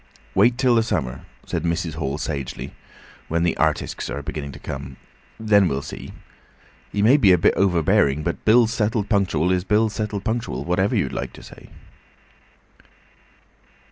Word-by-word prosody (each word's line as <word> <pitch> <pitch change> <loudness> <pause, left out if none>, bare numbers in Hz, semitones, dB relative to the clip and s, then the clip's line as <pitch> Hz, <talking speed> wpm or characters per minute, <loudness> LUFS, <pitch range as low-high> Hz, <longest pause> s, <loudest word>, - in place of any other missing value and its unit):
"Wait 120 +5 +4
till 130 -1 +3
the 115 - +4
summer," 65 - -3 0.2
said - - -3
Mrs. 85 0 -2
Hall 70 -3 -3
sagely, 70 -4 -5 0.5
"when 85 +1 0
the 85 - +1
artisks 80 -5 -1
are 70 +4 -5
beginning 75 -2 -5
to - - -10
come. 65 0 -7 0.4
Then 105 -3 +4
we'll 70 -2 -2
see. 70 - -8 0.8
He 100 - 0
may 125 +7 +6
be 105 -10 +5
a 90 - +6
bit 80 - +3
overbearing, 80 -6 +2
but 85 +2 -3
bills 115 +1 +4
settled 110 -2 -1
punctual 95 -5 +1
is 90 -1 +1
bills 105 +2 +1
settled 105 -2 -3
punctual, 110 - -3
whatever 95 +3 +1
you'd - - 0
like - - -4
to - - -13
say." - - -14
90 Hz, 160 wpm, -22 LUFS, 75-110 Hz, 0.8 s, may